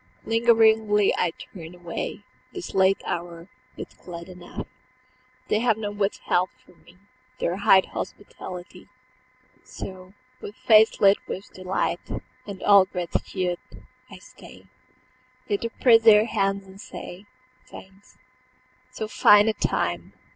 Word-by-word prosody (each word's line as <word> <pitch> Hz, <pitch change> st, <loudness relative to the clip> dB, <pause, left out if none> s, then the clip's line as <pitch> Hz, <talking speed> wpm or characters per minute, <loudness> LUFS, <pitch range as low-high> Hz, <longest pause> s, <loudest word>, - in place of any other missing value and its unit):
Lingeringly 220 Hz, -2 st, +3 dB
I 180 Hz, -, +1 dB
turn 165 Hz, 0 st, -11 dB
away, 175 Hz, -1 st, -6 dB, 0.3 s
This 370 Hz, -2 st, -7 dB
late 190 Hz, 0 st, +3 dB
hour, 170 Hz, +1 st, -5 dB, 0.3 s
yet -, -, -9 dB
glad 170 Hz, 0 st, -9 dB
enough 180 Hz, -1 st, -9 dB, 0.8 s
They 210 Hz, -, +1 dB
have 225 Hz, -2 st, +2 dB
not 205 Hz, -2 st, -5 dB
withheld 195 Hz, -2 st, 0 dB, 0.2 s
from 180 Hz, -, -23 dB
me 175 Hz, -, -20 dB, 0.4 s
Their 175 Hz, +2 st, -1 dB
high 195 Hz, -1 st, +5 dB
hospitality. 180 Hz, -2 st, -8 dB, 0.8 s
So, 185 Hz, 0 st, -10 dB, 0.3 s
with 205 Hz, -, -8 dB
face 220 Hz, 0 st, +4 dB
lit 200 Hz, 0 st, +6 dB
with 190 Hz, -, -7 dB
delight 185 Hz, 0 st, -2 dB, 0.5 s
And 200 Hz, -2 st, -8 dB
all 200 Hz, -2 st, +6 dB
gratitude, 180 Hz, 0 st, -3 dB, 0.5 s
I -, -, -11 dB
stay -, -, -15 dB, 0.8 s
Yet 205 Hz, -, -1 dB
to 230 Hz, -, -2 dB
press 230 Hz, -1 st, +4 dB
their 220 Hz, -1 st, +6 dB
hands 195 Hz, -3 st, -1 dB
and 190 Hz, +1 st, -14 dB
say, 190 Hz, +4 st, -10 dB, 0.4 s
"Thanks. 195 Hz, +1 st, -15 dB, 0.7 s
So 240 Hz, -4 st, -5 dB
fine 210 Hz, -1 st, +5 dB
a 220 Hz, -, +2 dB
time 85 Hz, -, -2 dB
195 Hz, 125 wpm, -24 LUFS, 180-215 Hz, 0.8 s, lit